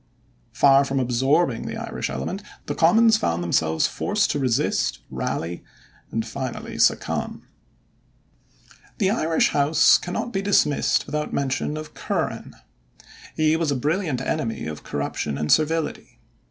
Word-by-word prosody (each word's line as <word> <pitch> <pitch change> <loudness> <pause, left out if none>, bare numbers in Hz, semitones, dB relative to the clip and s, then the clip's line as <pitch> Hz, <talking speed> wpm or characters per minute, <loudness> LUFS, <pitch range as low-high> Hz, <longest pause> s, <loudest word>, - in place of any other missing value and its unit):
Far 140 0 +5
from 135 0 -1
absorbing 130 +2 +1
the - - -5
Irish - - -4
element, 70 - -4 0.2
the - - -3
Commons 220 +7 +5
found 85 - -1
themselves 80 -2 +1
forced - - 0
to 145 - -1
resist, 125 - 0
rally, 85 +1 -3 0.5
and 115 0 -2
finally 120 +3 -6
succumb. - - +1 1.5
The 195 -1 +2
Irish 165 -7 +2
House 145 +2 +4
cannot 180 +7 -4
be 195 - 0
dismissed 185 -8 +2
without 150 0 -3
mention 140 +2 -1
of 155 0 -8
Curran. - - -3 0.8
He 155 0 +3
was 165 -2 0
a 140 - +1
brilliant 150 0 -1
enemy 115 - -2
of 75 -1 -6
corruption 70 0 -3
and 75 0 -1
servility. 160 +1 0
140 Hz, 130 wpm, -23 LUFS, 115-160 Hz, 1.5 s, Far